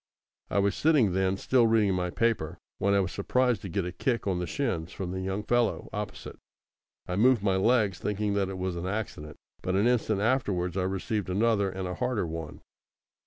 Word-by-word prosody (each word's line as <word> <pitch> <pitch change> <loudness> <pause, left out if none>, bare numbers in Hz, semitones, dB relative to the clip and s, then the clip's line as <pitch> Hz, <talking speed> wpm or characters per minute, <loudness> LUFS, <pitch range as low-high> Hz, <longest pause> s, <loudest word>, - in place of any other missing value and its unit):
I - - -1
was 100 0 +3
sitting, 145 - +3
then, 95 +1 +1
still 120 +2 +3
reading 110 -3 +3
my 90 -1 -1
paper, 115 -5 0 0.2
when 100 0 +2
I 100 - +4
was 90 - -2
surprised 125 +4 +1
to 95 - -6
get 90 +1 -1
a 90 - -3
kick 120 +7 -1
on 95 -3 0
the 90 - -3
shins 95 - -2
from 95 -4 -5
the 95 0 -3
young 95 +2 -2
fellow 120 0 +1
opposite. 105 0 -6 0.7
I 90 - -2
moved 115 +1 +4
my 95 -2 +2
legs, 105 -2 +2
thinking 105 0 -1
that 100 -1 0
it 95 - -5
was 90 -1 -2
an 85 +1 -4
accident, 95 -7 -4 0.2
but 90 - -1
an 100 +3 +3
instant 115 -4 +2
afterwards 100 -7 0
I 95 -1 0
received 95 +1 -2
another 100 +1 +2
and 95 0 -4
a 90 - -3
harder 125 +1 -1
one. 80 -2 -6
100 Hz, 205 wpm, -28 LUFS, 90-110 Hz, 0.7 s, I